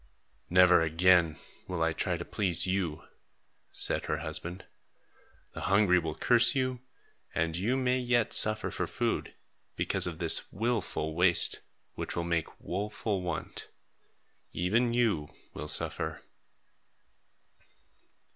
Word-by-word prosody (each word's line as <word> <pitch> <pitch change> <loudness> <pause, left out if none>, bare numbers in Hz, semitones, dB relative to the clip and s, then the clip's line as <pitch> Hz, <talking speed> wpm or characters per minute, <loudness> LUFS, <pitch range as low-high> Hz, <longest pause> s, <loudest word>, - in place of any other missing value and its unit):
"Never 90 -1 +5
again 85 0 +3 0.3
will 90 -3 -2
I 80 0 0
try 85 +2 -2
to 85 - -7
please 90 -6 +2
you," 90 -5 -2 0.7
said - - +2
her 75 - -2
husband. 85 +3 -7 0.9
"The - - -8
hungry 95 -2 +3
will 80 -2 -5
curse 120 +3 +4
you, 130 -1 -1 0.6
and 80 0 -1
you 110 +9 -1
may 130 -1 0
yet 120 -2 0
suffer 110 0 +4
for - - -3
food, - - -3 0.4
because - - +1
of 85 -2 -6
this 85 -1 +4
wilful 110 -8 -2
waste, 85 +1 +4 0.3
which - - -5
will 85 - -2
make 85 -2 -3
woful 100 +1 -4
want. 85 -3 -6 0.8
Even 115 +8 0
you 110 -11 -1 0.2
will - - -7
suffer." - - -3
90 Hz, 120 wpm, -29 LUFS, 85-110 Hz, 0.9 s, Never